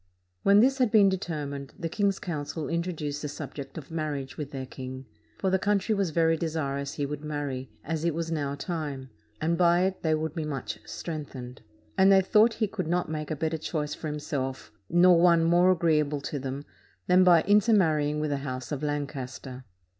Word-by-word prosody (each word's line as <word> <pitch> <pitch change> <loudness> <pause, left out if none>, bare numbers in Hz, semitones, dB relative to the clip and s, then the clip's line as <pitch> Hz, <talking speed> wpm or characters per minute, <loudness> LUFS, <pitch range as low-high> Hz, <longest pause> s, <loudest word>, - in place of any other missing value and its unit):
When 200 +1 +6
this 270 +3 +3
had 250 -3 +4
been 205 -2 +6
determined, 145 -7 -4
the 175 -4 -3
king's 200 +3 0
council 155 -2 -4
introduced 165 -4 -3
the 150 - -3
subject 140 0 -7
of 155 0 -9
marriage 150 -4 -3
with 150 -3 -5
their 135 -2 -5
king; 130 0 -8 0.3
for 190 - 0
the 190 - +3
country 205 +2 +1
was 200 -4 0
very 165 +1 +3
desirous 140 -4 -2
he 145 - -1
would 150 +1 -5
marry, 145 -4 -4
as 160 -1 -3
it 170 -2 +1
was 165 0 -3
now 145 -3 -1
time; 145 -5 -5 0.3
and 165 +2 0
by 175 0 +5
it 190 0 -1
they 160 -1 +2
would 155 -1 -3
be 165 -2 -3
much 145 -4 -4
strengthened; 140 -6 -7 0.4
and 190 +1 +7
they 195 -1 +7
thought 215 +4 +4
he 220 - 0
could 190 -5 -4
not 175 -1 0
make 155 -1 -4
a 155 - -1
better 160 +2 -2
choice 150 -2 -3
for 155 - -6
himself, 140 -3 -4 0.2
nor 175 0 +6
one 170 -2 +5
more 175 +2 +4
agreeable 150 -4 +1
to 145 0 -4
them, 135 +2 -5 0.4
than 180 +1 +5
by 175 -3 +6
inter 205 +3 +4
marrying 150 -6 +2
with 150 -1 -1
the 140 - 0
House 130 -2 -5
of 145 - -3
Lancaster. 135 -3 -4
155 Hz, 195 wpm, -27 LUFS, 140-175 Hz, 0.4 s, and